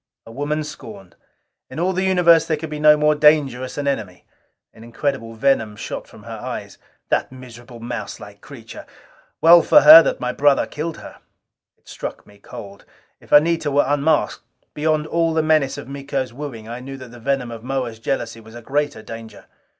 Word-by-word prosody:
A 115 - -12
woman 145 +5 -3
scorned! 105 - -11 0.5
In - - -8
all 185 +2 0
the 185 - -1
universe 175 -3 +4
there 155 - 0
could 155 0 -7
be 150 - -5
no 150 0 +6
more 150 0 +3
dangerous 145 -4 +2
an 145 -1 -3
enemy. 105 -10 -4 0.5
An 110 - -15
incredible 115 -1 -4
venom 110 -3 +1
shot - - -7
from - - -16
her - - -8
eyes. - - -7 0.3
"That - - 0
miserable 120 -1 -12
mouselike 115 -3 -8
creature! 125 -5 -12 0.5
Well 170 +1 +8
for 300 - +5
her 310 +2 +11
that - - -2
my - - -2
brother 145 -1 +3
killed 160 +2 -6
her." - - -12 0.6
It - - -37
struck - - -7
me 100 0 -20
cold. 100 0 -11 0.4
If - - -21
Anita 155 +1 +4
were 145 0 +2
unmasked, 145 +2 0 0.3
beyond 155 0 0
all 165 0 0
the 160 - +2
menace 155 -4 +1
of - - -8
Miko's 135 -2 -4
wooing, 125 -5 -8
I 120 +2 -7
knew 135 +2 -9
that 130 -2 -11
the 120 - -13
venom 130 -1 -2
of 115 -1 -9
Moa's 125 -3 -4
jealousy 115 -2 -3
was 110 0 -15
a 120 - -9
greater 145 -4 -2
danger. 115 0 -10
135 Hz, 185 wpm, -20 LUFS, 115-150 Hz, 0.6 s, her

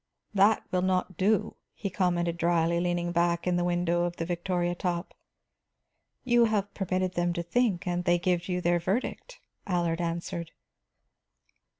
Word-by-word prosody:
"That 205 +2 +4
will 180 - +1
not 185 0 0
do," 195 +3 +1 0.2
he 200 -2 -4
commented 175 -3 0
drily, 170 0 +2
leaning 175 0 -1
back 170 0 +1
in 180 -1 +1
the 175 0 +1
shadow 175 0 +1
of 175 0 -3
the 165 - -3
victoria 175 0 -1
top. 175 0 -3 1.1
"You 240 -2 +4
have 205 -2 -1
permitted 185 -1 -1
them 175 0 0
to 170 -1 -3
think, 195 0 0
and 175 0 -1
they 175 0 +3
give 175 0 0
you 180 0 -1
their 175 0 +2
verdict," 220 - -3 0.3
Allard 175 -2 0
answered. 170 0 -4
175 Hz, 155 wpm, -28 LUFS, 170-185 Hz, 1.1 s, That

